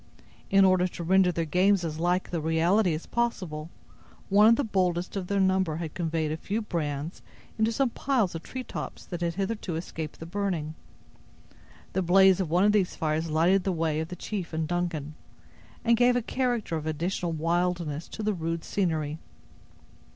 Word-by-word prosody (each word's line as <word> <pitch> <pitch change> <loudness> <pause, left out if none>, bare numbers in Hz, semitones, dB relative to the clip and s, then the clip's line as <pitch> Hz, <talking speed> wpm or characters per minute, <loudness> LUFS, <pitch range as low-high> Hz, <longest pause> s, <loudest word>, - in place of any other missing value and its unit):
In 195 0 +6
order 185 -1 +4
to 175 - -7
render 185 +1 +4
their 165 -1 -1
games 185 +4 +3
as 160 -1 -4
like 180 +2 0
the 170 -2 -1
reality 165 +4 +2
as 155 - -6
possible, 180 -10 -2 0.6
one 205 +2 +6
of 230 - +7
the 285 - 0
boldest 185 -5 0
of 190 -2 -3
their 200 +1 0
number 190 -4 +2
had 160 -2 -5
conveyed 160 -3 -1
a 155 - -2
few 205 +6 -2
brands 155 -6 -3 0.4
into 220 +1 +3
some 260 +1 +1
piles 245 -10 0
of 165 - -5
tree 255 +7 -6
tops - - -7
that 175 -2 -6
had 170 -1 -1
hitherto 195 -3 -2
escaped 160 -2 -6
the 165 - -7
burning. 175 -4 -2 1.2
The 190 - +1
blaze 190 +1 +5
of 185 -5 -1
one 175 +4 +3
of 210 - +5
these 200 -4 +1
fires 160 +1 -1
lighted 175 +5 +3
the 190 - 0
way 160 -3 0
of 160 - -2
the 180 - -7
chief 185 -2 -5
and 160 0 -1
Duncan, 165 -3 -2 0.7
and 235 0 +5
gave 245 +1 +4
a 245 - +1
character 240 -9 -1
of 155 0 -5
additional 170 +3 -2
wildness 170 -1 -1
to 215 - -7
the 210 0 +1
rude 165 -2 -3
scenery. 160 -5 -1
175 Hz, 185 wpm, -27 LUFS, 160-195 Hz, 1.2 s, of